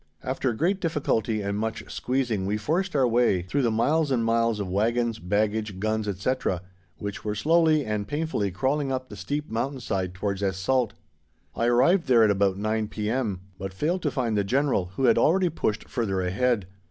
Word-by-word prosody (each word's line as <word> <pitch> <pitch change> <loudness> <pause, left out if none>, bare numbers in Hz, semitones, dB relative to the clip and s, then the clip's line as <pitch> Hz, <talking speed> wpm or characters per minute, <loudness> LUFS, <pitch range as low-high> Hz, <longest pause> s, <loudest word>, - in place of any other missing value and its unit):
After 130 0 -1
great 185 - 0
difficulty 120 - 0
and 100 +1 -2
much 110 0 -3
squeezing 120 -7 -1
we 105 +2 0
forced 165 - -1
our 135 -3 +4
way 115 -6 +2
through 135 +11 -1
the 120 - +2
miles 145 +8 +2
and 120 -4 +1
miles 115 -1 +2
of 100 - -2
wagons, 115 +4 0
baggage, 105 +1 -1
guns, 110 +1 -1
etc., 100 -2 -1 0.3
which 100 +2 -6
were 105 -1 -2
slowly 155 +4 +3
and 105 -1 -2
painfully 150 -9 -1
crawling 135 +9 0
up 130 0 -3
the - - -8
steep 145 +8 -4
mountain 130 +5 -2
side 95 -6 -2
towards 100 +1 -2
Es 95 -2 0
Salt. 120 +4 +1 0.6
I 115 - +1
arrived 145 +8 +4
there 120 -3 +6
at 105 - +5
about 100 -1 +1
9 110 +1 -1
p.m., 105 -2 -2 0.2
but 95 0 -6
failed 170 - 0
to - - 0
find 120 -5 -1
the 100 - +2
General, 130 -2 +1
who 135 - -2
had 125 - +5
already 180 +3 +3
pushed 110 -9 -2
further 100 -6 -1
ahead. 100 +4 +1
115 Hz, 190 wpm, -26 LUFS, 100-135 Hz, 0.6 s, there